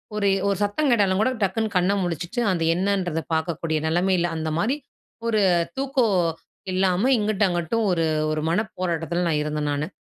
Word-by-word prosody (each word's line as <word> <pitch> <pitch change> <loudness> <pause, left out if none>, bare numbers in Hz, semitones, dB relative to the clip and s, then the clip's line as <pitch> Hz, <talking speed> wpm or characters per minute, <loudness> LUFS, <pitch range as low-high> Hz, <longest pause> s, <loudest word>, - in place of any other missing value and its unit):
ஒரு 205 -1 +1 0.2
ஒரு 200 -1 +1
சத்தம் 205 +9 0
கேட்டாலும் 200 -5 +3
கூட 255 +4 +2
டக்குனு 215 +3 0
கண்ண 180 +2 +2
முழிச்சுட்டு, 175 - -3
அந்த 170 -3 0
என்னன்றத 180 -3 0
பார்க்கக்கூடிய 160 -1 -1
நிலைமையில, 175 +1 +2
அந்தமாரி 160 - -1 0.5
ஒரு 215 -2 +2 0.4
தூக்கோ 270 -2 +1 0.7
இல்லாம 190 +6 +2
இங்கிட்டும், 210 -2 +1
அங்குட்டும் 175 +6 -1
ஒரு 165 -2 +1 0.3
ஒரு 155 - -1
மனப்போராட்டத்தில 175 -3 -1
நான் 155 -3 +1
இருந்தேன் 150 -1 -2
நானு. 145 +2 -2
180 Hz, 145 wpm, -23 LUFS, 165-210 Hz, 0.7 s, கேட்டாலும்